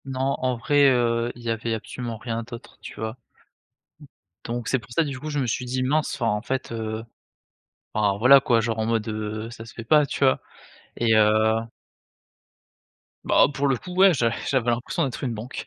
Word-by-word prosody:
Non 135 Hz, 0 st, -1 dB
en 130 Hz, -1 st, +1 dB
vrai, 145 Hz, +4 st, +3 dB
heu, 120 Hz, -1 st, +1 dB
il 120 Hz, -, -13 dB
y 115 Hz, -, -3 dB
avait 115 Hz, 0 st, -2 dB
absolument 115 Hz, +1 st, -6 dB
rien 115 Hz, 0 st, -4 dB
d'autre, 120 Hz, 0 st, -11 dB
tu -, -, -9 dB
vois? 110 Hz, 0 st, -3 dB
D -, -, -22 dB, 1.3 s
donc 120 Hz, -1 st, -4 dB
c'est 130 Hz, -, +1 dB
pour 115 Hz, +1 st, -17 dB
ça, 165 Hz, -, +2 dB
du 140 Hz, -3 st, -5 dB
coup 155 Hz, +3 st, -6 dB
je 150 Hz, -1 st, -2 dB
me 135 Hz, -, 0 dB
suis 120 Hz, +2 st, -2 dB
dit: 130 Hz, +1 st, -2 dB
«Mince» 150 Hz, +4 st, 0 dB
enfin, 120 Hz, -, -2 dB
en 105 Hz, 0 st, -1 dB
fait, 130 Hz, +2 st, -3 dB
heu 110 Hz, -1 st, -4 dB, 0.9 s
enfin 100 Hz, -2 st, +1 dB
voilà 135 Hz, +5 st, +7 dB
quoi, 125 Hz, -4 st, +2 dB
genre 115 Hz, 0 st, -2 dB
en 110 Hz, -, 0 dB
mode, 115 Hz, -1 st, 0 dB
heu, 110 Hz, 0 st, -4 dB
ça 115 Hz, -1 st, -9 dB
se 115 Hz, -, -12 dB
fait 115 Hz, -, -8 dB
pas 150 Hz, +5 st, +5 dB
tu 140 Hz, -, -5 dB
vois? 130 Hz, -, +3 dB, 0.6 s
Et 115 Hz, -1 st, +2 dB
heu 110 Hz, +1 st, +4 dB, 1.7 s
Bah, -, -, +5 dB
pour 140 Hz, +1 st, 0 dB
le 135 Hz, -2 st, +2 dB
coup 180 Hz, +8 st, -9 dB
ouais, 190 Hz, 0 st, +6 dB
j'a 115 Hz, -3 st, +1 dB, 0.2 s
j'avais 125 Hz, -3 st, +1 dB
l'impression 120 Hz, +8 st, -1 dB
d'être 135 Hz, -2 st, -4 dB
une 125 Hz, -3 st, -1 dB
banque. 115 Hz, +5 st, -7 dB
120 Hz, 205 wpm, -24 LUFS, 110-130 Hz, 1.7 s, voilà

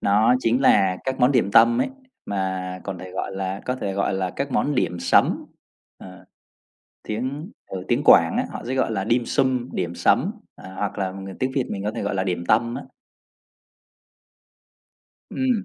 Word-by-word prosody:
Đó 110 Hz, +5 st, +4 dB
chính 120 Hz, 0 st, +1 dB
là 95 Hz, -8 st, +4 dB
các 130 Hz, 0 st, -3 dB
món 125 Hz, +3 st, +5 dB
điểm 120 Hz, -6 st, +2 dB
tâm 115 Hz, +3 st, +6 dB
ấy, -, -, +1 dB, 0.4 s
mà 95 Hz, -2 st, -3 dB
còn 95 Hz, -2 st, -5 dB
thể 95 Hz, +1 st, -9 dB
gọi -, -, -4 dB
là 95 Hz, 0 st, -3 dB
có 125 Hz, -, -1 dB
thể 100 Hz, -6 st, -3 dB
gọi 100 Hz, 0 st, 0 dB
là 95 Hz, -1 st, -1 dB
các 140 Hz, +7 st, -4 dB
món 145 Hz, -, +1 dB
dimsum, 90 Hz, -8 st, +2 dB, 0.5 s
ờ, 95 Hz, -1 st, -12 dB, 0.8 s
tiếng 130 Hz, -, -4 dB, 0.2 s
ừ, 95 Hz, -1 st, -6 dB
tiếng -, -, +1 dB
Quảng -, -, +6 dB
á, -, -, +1 dB
họ -, -, -7 dB
sẽ 130 Hz, -, -2 dB
gọi 130 Hz, -, +1 dB
là 95 Hz, -3 st, -1 dB
dimsum, 125 Hz, +1 st, +1 dB
điểm 85 Hz, -1 st, -3 dB
sắm, -, -, +2 dB, 0.2 s
ờ, 95 Hz, -, -12 dB
hoặc 100 Hz, +2 st, -3 dB
là 95 Hz, -2 st, -1 dB
người 95 Hz, 0 st, -8 dB
tiếng 130 Hz, -, 0 dB
Việt 135 Hz, -3 st, +1 dB
mình 100 Hz, 0 st, -4 dB
có 105 Hz, -, 0 dB
thể -, -, -5 dB
gọi 100 Hz, -1 st, -2 dB
là 95 Hz, -1 st, 0 dB
điểm 90 Hz, -2 st, -2 dB
tâm 115 Hz, +2 st, +2 dB
á. -, -, -5 dB, 2.5 s
Ừm. 250 Hz, -6 st, 0 dB
100 Hz, 185 wpm, -23 LUFS, 95-125 Hz, 2.5 s, tâm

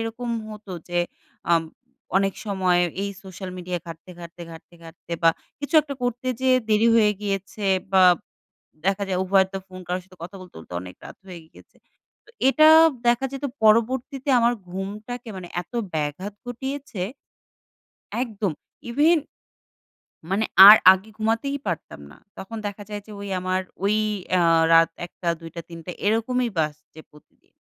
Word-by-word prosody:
এরকম 225 Hz, +2 st, -5 dB, 0.2 s
হতো 210 Hz, -2 st, -9 dB, 0.2 s
যে, 175 Hz, 0 st, -1 dB, 0.5 s
আম 165 Hz, -1 st, +4 dB, 0.5 s
অনেক 195 Hz, 0 st, +2 dB
সময় 185 Hz, -3 st, +2 dB, 0.2 s
এই 200 Hz, -, -2 dB, 0.2 s
সোশ্যাল 190 Hz, 0 st, -8 dB
মিডিয়া 180 Hz, 0 st, -4 dB
ঘাটতে, 165 Hz, +2 st, -10 dB
ঘাটতে, 170 Hz, 0 st, -10 dB
ঘাটতে, 165 Hz, +1 st, -13 dB
ঘাটতে 165 Hz, +1 st, -11 dB
বা, 165 Hz, -, +7 dB, 0.3 s
কিছু 290 Hz, +3 st, -5 dB
একটা 285 Hz, -1 st, -6 dB
করতে 245 Hz, +1 st, -2 dB
যেয়ে 260 Hz, -1 st, +4 dB
দেরি 215 Hz, +2 st, +4 dB
হয়ে 210 Hz, -2 st, +4 dB
গিয়েছে। 200 Hz, 0 st, -3 dB, 0.3 s
বাব 185 Hz, -2 st, +6 dB, 0.7 s
দেখা 195 Hz, +1 st, +1 dB
যায় 185 Hz, -1 st, -1 dB
উভয়ের 190 Hz, 0 st, +3 dB
তো -, -, -2 dB
ফোন 185 Hz, -1 st, -10 dB
কারো 180 Hz, +1 st, -1 dB
সাথে 185 Hz, 0 st, -20 dB
কথা 180 Hz, +3 st, -9 dB
বলতে, 180 Hz, -, -14 dB
বলতে 80 Hz, -, -12 dB
অনেক 90 Hz, -1 st, -10 dB
রাত -, -, -11 dB
হয়ে 180 Hz, -2 st, -8 dB
গিয়েছে। -, -, -20 dB, 0.5 s
তো, -, -, -23 dB, 0.2 s
এটা 310 Hz, +3 st, +6 dB, 0.4 s
দেখা 240 Hz, +2 st, +3 dB
যেত 275 Hz, +1 st, -6 dB, 0.2 s
পরবর্তীতে 250 Hz, +5 st, +2 dB
আমার 235 Hz, +1 st, +3 dB, 0.2 s
ঘুমটাকে 210 Hz, +6 st, -6 dB
মানে 180 Hz, -, -8 dB
এত 180 Hz, -, -21 dB, 0.2 s
ব্যাঘাত 155 Hz, +7 st, -3 dB
ঘটিয়েছে 265 Hz, -3 st, -5 dB, 1.2 s
একদম। 210 Hz, -7 st, -3 dB, 0.4 s
even 300 Hz, +8 st, +4 dB, 1.1 s
মানে 200 Hz, +3 st, +1 dB, 0.2 s
আর 215 Hz, -, +12 dB, 0.2 s
আগে 190 Hz, +3 st, -4 dB
ঘুমাতেই 230 Hz, +6 st, -1 dB
পারতাম 165 Hz, -, -4 dB
না। -, -, -16 dB, 0.2 s
তখন 225 Hz, +4 st, -7 dB
দেখা 205 Hz, 0 st, -6 dB
যায় 205 Hz, -1 st, -6 dB
যে, -, -, -13 dB
ঔ -, -, -9 dB, 0.2 s
আমার 185 Hz, 0 st, -1 dB, 0.2 s
ঔ -, -, -2 dB, 0.5 s
এ্যা 180 Hz, -1 st, +4 dB, 0.3 s
রাত 165 Hz, 0 st, +6 dB, 0.2 s
০১ঃ০০ 175 Hz, 0 st, -6 dB
০২ঃ০০ 165 Hz, +1 st, -8 dB
০৩ঃ০০ 170 Hz, +1 st, -8 dB, 0.2 s
এরকমই 235 Hz, +3 st, +1 dB
বাজছে 155 Hz, 0 st, -3 dB
প্রতিদিন। 150 Hz, -1 st, -24 dB
195 Hz, 150 wpm, -23 LUFS, 180-230 Hz, 1.2 s, আর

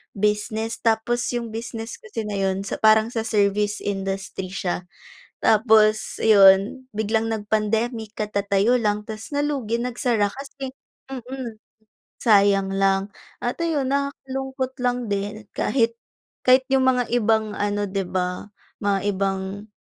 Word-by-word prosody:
business, 210 Hz, +2 st, -1 dB
tapos 230 Hz, +2 st, +1 dB
yung 240 Hz, -1 st, -2 dB
business 225 Hz, 0 st, -5 dB
kasi 230 Hz, -, -6 dB
na 210 Hz, -, -3 dB
'yun 195 Hz, 0 st, -1 dB
sa -, -, -2 dB
parang 220 Hz, 0 st, +5 dB
sa 230 Hz, -1 st, -3 dB
service 210 Hz, -1 st, +1 dB
industry 195 Hz, -1 st, -4 dB
siya. 180 Hz, -2 st, -2 dB, 0.6 s
Tapos 215 Hz, -1 st, +3 dB
ayon 205 Hz, +4 st, +6 dB
biglang 220 Hz, +1 st, 0 dB
nag-pandemic 220 Hz, +1 st, -1 dB
katatayo 205 Hz, +3 st, +1 dB
lang 210 Hz, -2 st, 0 dB
tas 220 Hz, +5 st, -7 dB
nalugi 275 Hz, -6 st, -1 dB
nagsara 235 Hz, -4 st, 0 dB
kasi 275 Hz, +1 st, -7 dB, 0.4 s
mm, 255 Hz, -3 st, -6 dB, 0.7 s
sayang 200 Hz, -3 st, +4 dB
lang 195 Hz, +1 st, +1 dB, 0.3 s
at 240 Hz, -, -1 dB
ayun 300 Hz, -6 st, 0 dB
nakakalungkot 265 Hz, -1 st, -2 dB
lang 245 Hz, 0 st, +2 dB
din 205 Hz, +2 st, -3 dB
kahit 230 Hz, -3 st, +1 dB, 0.5 s
kahit 255 Hz, +1 st, +6 dB
yung 265 Hz, -1 st, +4 dB
mga 250 Hz, -2 st, +2 dB
ibang 220 Hz, -2 st, +2 dB
ano 205 Hz, 0 st, -1 dB
'di 195 Hz, -1 st, -2 dB
ba 180 Hz, +1 st, -2 dB, 0.4 s
mga 200 Hz, -1 st, +2 dB, 0.2 s
ibang, 195 Hz, +2 st, -3 dB
220 Hz, 125 wpm, -23 LUFS, 200-240 Hz, 0.7 s, ayon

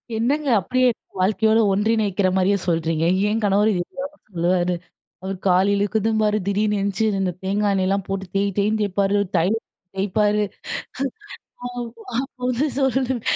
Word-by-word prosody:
என்னங்க, 275 Hz, +6 st, 0 dB
அப்படியே 255 Hz, +7 st, +2 dB, 0.3 s
வாழ்க்கையோட 220 Hz, +4 st, +3 dB
ஒன்றிணைக்கிற 205 Hz, -1 st, +1 dB
மாரியே 190 Hz, +2 st, +3 dB
சொல்றீங்க. 165 Hz, -1 st, +1 dB, 0.2 s
என் 220 Hz, +2 st, 0 dB
கணவரும் 205 Hz, +2 st, +3 dB
இதே 175 Hz, -, 0 dB, 0.2 s
தாங்க 285 Hz, +2 st, -7 dB
சொல்லுவாரு. 180 Hz, 0 st, +1 dB, 0.5 s
அவர் 190 Hz, 0 st, -4 dB
கால் 185 Hz, +2 st, +4 dB
இழுக்குதும்பாரு, 215 Hz, +1 st, +1 dB
திடீர்ன்னு 210 Hz, +1 st, +1 dB
எந்திச்சு 200 Hz, +2 st, -1 dB
இந்தந்த 195 Hz, -3 st, 0 dB
தேங்கா 205 Hz, +2 st, +1 dB
எண்ணெயல்லாம் 195 Hz, 0 st, 0 dB
போட்டு 195 Hz, 0 st, -3 dB
தேய் 200 Hz, 0 st, +2 dB
தேய்ன்னு 210 Hz, +2 st, +1 dB
தேய்ப்பாரு. 200 Hz, 0 st, +1 dB, 0.2 s
தைலத்த 205 Hz, +7 st, +1 dB, 0.3 s
தேய்ப்பாரு. 210 Hz, +2 st, +2 dB, 1.8 s
அப்ப 270 Hz, -1 st, -11 dB
வந்து 255 Hz, +4 st, +1 dB
சொல்லுவேன், 260 Hz, -2 st, +1 dB
205 Hz, 125 wpm, -22 LUFS, 190-220 Hz, 1.8 s, கால்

